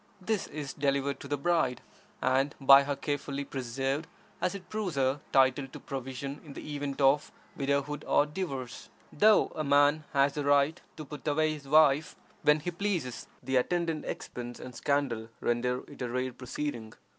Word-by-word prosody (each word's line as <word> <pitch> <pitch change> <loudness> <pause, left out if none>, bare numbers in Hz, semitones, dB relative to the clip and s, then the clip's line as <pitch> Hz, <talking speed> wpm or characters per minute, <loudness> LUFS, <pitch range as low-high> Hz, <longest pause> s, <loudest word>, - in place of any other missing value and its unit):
This 205 +1 -1
is 145 -1 -6
delivered 140 -1 0
to - - -8
the 145 +1 -1
bride, 150 -5 +1 0.4
and 135 +2 +2
by 135 0 +8
her 145 0 -1
carefully 140 -1 -3
preserved, 135 +4 -2 0.3
as 185 - 0
it 185 -3 -9
proves 205 -5 -3
her 135 +1 +1
title 135 0 +4
to - - -10
provision 135 +1 -6
in 150 -4 -10
the 150 - -7
event 145 -1 -4
of 140 +2 +3 0.2
widowhood 140 +1 -1
or 145 - +4
divorce. 145 -6 -5 0.2
Though 215 +6 +5
a 155 - -2
man 145 +2 +4
has 140 0 +3
the 145 - -2
right 145 +2 +3 0.2
to 155 - -6
put 150 0 -9
away 155 +1 +2
his 145 -2 -9
wife 150 0 +4 0.3
when 150 0 +4
he 175 - -3
pleases, 175 -9 -2 0.2
the 130 +1 +1
attendant 165 +3 0
expense 120 0 -6
and 125 - -8
scandal 130 -6 -1
render 125 +1 0
it - - -12
a 125 - -2
rare 125 +1 -2
proceeding. 125 -3 -5
140 Hz, 170 wpm, -30 LUFS, 135-150 Hz, 0.4 s, by